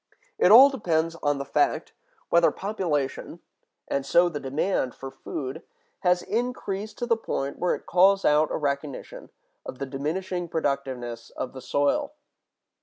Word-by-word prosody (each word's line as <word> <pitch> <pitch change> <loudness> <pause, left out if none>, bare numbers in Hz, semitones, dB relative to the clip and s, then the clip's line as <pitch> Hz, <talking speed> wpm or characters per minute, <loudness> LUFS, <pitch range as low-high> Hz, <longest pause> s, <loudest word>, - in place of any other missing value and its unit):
It 180 - +5
all 265 +5 +10
depends 165 -9 0
on 145 -1 +1
the 140 - -4
fact 350 - 0 0.4
whether 170 0 +5
population—and 150 -7 -4
so 170 +6 +4
the 150 -3 -5
demand 135 0 -1
for 135 0 -8
food—has 160 +6 -4
increased 220 -3 -3
to 240 - -2
the 235 -1 +3
point 140 -10 -4
where 180 - +1
it - - -12
calls 195 +2 +4
out 150 +1 +4
a - - -2
recognition 140 -2 -4 0.3
of - - -8
the 140 - -3
diminishing 170 +7 -3
productiveness 130 -7 -3
of 130 - -4
the 130 - -8
soil. 280 - 0
160 Hz, 140 wpm, -26 LUFS, 140-190 Hz, 0.4 s, all